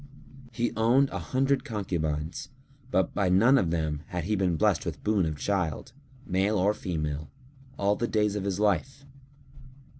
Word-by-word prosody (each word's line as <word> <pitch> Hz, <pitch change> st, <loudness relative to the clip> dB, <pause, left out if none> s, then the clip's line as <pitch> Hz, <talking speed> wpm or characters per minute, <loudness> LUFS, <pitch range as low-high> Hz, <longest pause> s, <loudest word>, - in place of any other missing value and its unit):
He 120 Hz, +1 st, -1 dB
owned 125 Hz, +5 st, +3 dB
an -, -, -4 dB
hundred 135 Hz, +1 st, +1 dB
concubines, 80 Hz, -7 st, -3 dB, 0.4 s
but 95 Hz, -8 st, +1 dB
by 100 Hz, -3 st, +1 dB
none 115 Hz, +9 st, +5 dB
of 90 Hz, -, 0 dB
them 80 Hz, -3 st, -1 dB
had 90 Hz, -4 st, -3 dB
he 105 Hz, +5 st, 0 dB
been 95 Hz, -3 st, +1 dB
blessed -, -, +2 dB
with -, -, -6 dB
boon 105 Hz, -5 st, +2 dB
of 75 Hz, -1 st, -3 dB
child, 95 Hz, -, -2 dB, 0.3 s
male 95 Hz, +3 st, +1 dB
or 100 Hz, +3 st, +3 dB
female, 75 Hz, -6 st, -4 dB, 0.5 s
all 100 Hz, +1 st, +2 dB
the 120 Hz, -, -1 dB
days 105 Hz, -2 st, +1 dB
of 105 Hz, -, -2 dB
his 100 Hz, -1 st, -2 dB
life. 105 Hz, -, 0 dB
100 Hz, 160 wpm, -28 LUFS, 85-110 Hz, 0.5 s, none